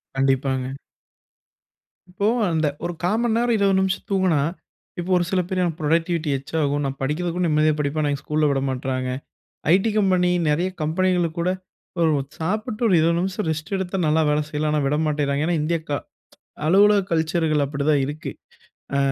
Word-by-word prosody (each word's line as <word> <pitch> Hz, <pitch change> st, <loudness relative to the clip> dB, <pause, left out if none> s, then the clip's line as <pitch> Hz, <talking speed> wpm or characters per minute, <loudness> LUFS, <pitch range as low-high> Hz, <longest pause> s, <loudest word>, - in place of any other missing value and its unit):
கண்டிப்பாங்க. 135 Hz, -1 st, 0 dB, 1.4 s
இப்போ, 200 Hz, +3 st, -1 dB, 0.2 s
அந்த 160 Hz, -2 st, +1 dB, 0.2 s
ஒரு 175 Hz, -, -2 dB
கால்மன் 220 Hz, +6 st, +1 dB
நேரம், 240 Hz, 0 st, +2 dB
20 200 Hz, -1 st, +3 dB
நிமிஷம் 190 Hz, 0 st, -1 dB
தூங்குனா, 185 Hz, -6 st, +2 dB, 0.6 s
இப்போ 175 Hz, -, -4 dB
ஒரு 175 Hz, -, +2 dB
சில 190 Hz, -, +1 dB
பேர் 185 Hz, 0 st, -1 dB
எனக்கு 170 Hz, -2 st, -2 dB
புரொடக்டிவிட்டி 165 Hz, +1 st, 0 dB
எக்ஸ்ட்ராகும். 145 Hz, +1 st, -1 dB
நான் 135 Hz, 0 st, -3 dB
படிக்கறதுக்கும் 170 Hz, +5 st, -1 dB
நிம்மதியாக 155 Hz, -1 st, +3 dB
படிப்பேன். 150 Hz, +1 st, 0 dB
ஆனா, 145 Hz, -, +1 dB
எங்க 140 Hz, -, -5 dB
ஸ்கூல்‌ல 150 Hz, 0 st, +1 dB
விடமாற்றாங்க. 130 Hz, -1 st, -2 dB, 0.7 s
ஐடீ 195 Hz, +4 st, +2 dB
கம்பெனி, 185 Hz, -3 st, +3 dB, 0.2 s
நெறைய 170 Hz, +5 st, +1 dB
கம்பெனிகளுக்கு 175 Hz, +1 st, 0 dB
கூட 175 Hz, +2 st, +1 dB, 0.5 s
ஒரு 165 Hz, -1 st, +4 dB, 0.3 s
சாப்பிட்டு 215 Hz, +7 st, -2 dB
ஒரு 195 Hz, -, +4 dB
20 165 Hz, +1 st, +2 dB
நிமிஷம் 190 Hz, +2 st, -2 dB
ரெஸ்ட் 160 Hz, +5 st, -4 dB
எடுத்தா 190 Hz, 0 st, -3 dB
நல்ல 155 Hz, +1 st, +3 dB
வேல 150 Hz, 0 st, +2 dB
செய்யலாம். 150 Hz, 0 st, -1 dB
ஆனா 150 Hz, -, +2 dB
விடமாட்டேங்கராங்க. 150 Hz, -1 st, 0 dB
ஏன்னா 170 Hz, -1 st, +1 dB
இந்திய 165 Hz, +3 st, 0 dB
க -, -, -8 dB, 0.8 s
அலுவலக 200 Hz, +4 st, +5 dB
கல்ச்சர்‌கள் 160 Hz, -2 st, +1 dB
அப்டித்தா 140 Hz, +2 st, 0 dB
இருக்கு. 150 Hz, 0 st, -5 dB, 0.7 s
ஆ, -, -, +2 dB
160 Hz, 155 wpm, -23 LUFS, 150-185 Hz, 1.4 s, அலுவலக